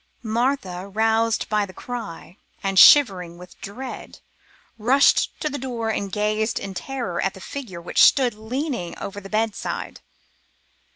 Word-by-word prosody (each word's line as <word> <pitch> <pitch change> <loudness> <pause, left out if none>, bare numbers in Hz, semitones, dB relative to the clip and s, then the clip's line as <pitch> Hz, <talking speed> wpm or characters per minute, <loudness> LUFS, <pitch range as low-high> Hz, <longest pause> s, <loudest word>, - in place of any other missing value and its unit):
Martha, 220 -5 -1
roused 225 +2 +1
by 210 -1 +1
the 185 -2 -8
cry, 225 -8 -7 0.3
and 195 -1 +2
shivering 180 -8 +6
with 180 +1 -14
dread, 250 +6 -8 0.6
rushed 260 +6 +3
to 305 - -2
the 285 -1 -4
door 235 -3 -3
and 200 -2 -3
gazed 215 +2 0
in 195 - -6
terror 215 -2 -4
at 195 - -1
the - - -11
figure 210 -5 -7
which 170 - 0
stood 255 -4 +5
leaning 230 - -4
over 200 +1 -7
the 195 - -11
bedside. 215 0 -3
215 Hz, 140 wpm, -23 LUFS, 195-245 Hz, 0.6 s, shivering